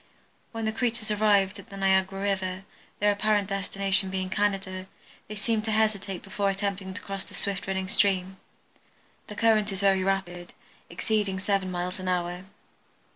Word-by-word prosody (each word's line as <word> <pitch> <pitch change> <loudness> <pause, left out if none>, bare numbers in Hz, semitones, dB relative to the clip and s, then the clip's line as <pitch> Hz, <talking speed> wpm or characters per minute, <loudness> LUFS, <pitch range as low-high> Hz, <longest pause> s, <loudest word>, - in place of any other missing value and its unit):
When 225 -1 -3
the 220 - +1
creatures 230 -1 -1
arrived 205 -1 +3
at 195 - -13
the 195 - -8
Niagara 190 0 +2
river, 190 -1 -1 0.3
their 205 0 +4
apparent 205 -1 +2
destination 195 -1 +1
being 185 -1 -3
Canada, 195 -2 0 0.4
they 215 - -6
seemed 215 +1 0
to 220 - 0
hesitate 210 -3 0
before 200 0 0
attempting 195 -1 -2
to - - -5
cross 195 -1 -4
the - - -13
swift 200 -1 -2
running 190 -1 -1
stream. 190 -1 +1 0.9
The 210 - -8
current 215 -2 +3
is 195 0 -3
very 195 -1 +4
rapid, 180 -2 -2 0.4
exceeding 195 +2 0
seven 195 -1 0
miles 180 +1 -3
an 185 - -5
hour. 180 0 -1
195 Hz, 160 wpm, -27 LUFS, 190-205 Hz, 0.9 s, their